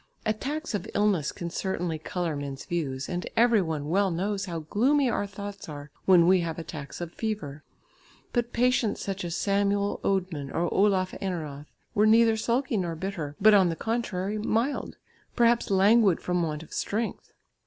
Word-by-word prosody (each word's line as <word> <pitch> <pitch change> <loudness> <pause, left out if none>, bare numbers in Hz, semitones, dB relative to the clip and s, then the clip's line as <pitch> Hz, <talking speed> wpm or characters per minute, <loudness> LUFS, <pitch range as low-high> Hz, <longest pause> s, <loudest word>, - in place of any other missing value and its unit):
Attacks 275 +9 -2
of 205 - -3
illness 200 -8 +2
can 170 -1 -6
certainly 180 -4 -2
colour 170 0 -3
men's 140 -2 -6
views, 140 -6 -3
and 175 0 -3
every 230 -2 +5
one 155 -4 -3
well 195 +4 +2
knows 195 +3 -2
how 170 -4 -4
gloomy 260 - +2
our 205 - -1
thoughts 200 -1 -8
are 145 -1 -8
when 180 -3 +6
we 185 +1 +5
have 165 -2 -3
attacks 155 -2 -7
of 170 -1 -5
fever. 205 -10 -4 0.7
But 240 -1 0
patients 245 -2 +1
such 195 -1 -3
as 170 -1 -3
Samuel 200 0 +1
Oedmann 180 -8 -1
or 175 +1 0
Olaf 190 -2 +2
Eneroth 155 -6 -4 0.3
were 210 +1 +4
neither 225 0 +5
sulky 235 +2 0
nor 175 -3 -2
bitter, 165 -5 -4
but, 215 +2 +7
on 190 -3 +5
the 165 - -2
contrary, 215 -2 -2
mild, 230 +6 -1 0.4
perhaps 235 -1 +3
languid 200 0 +4
from 180 -1 -1
want 155 -2 -2
of - - -14
strength. 220 +3 -3
190 Hz, 165 wpm, -27 LUFS, 165-215 Hz, 0.7 s, but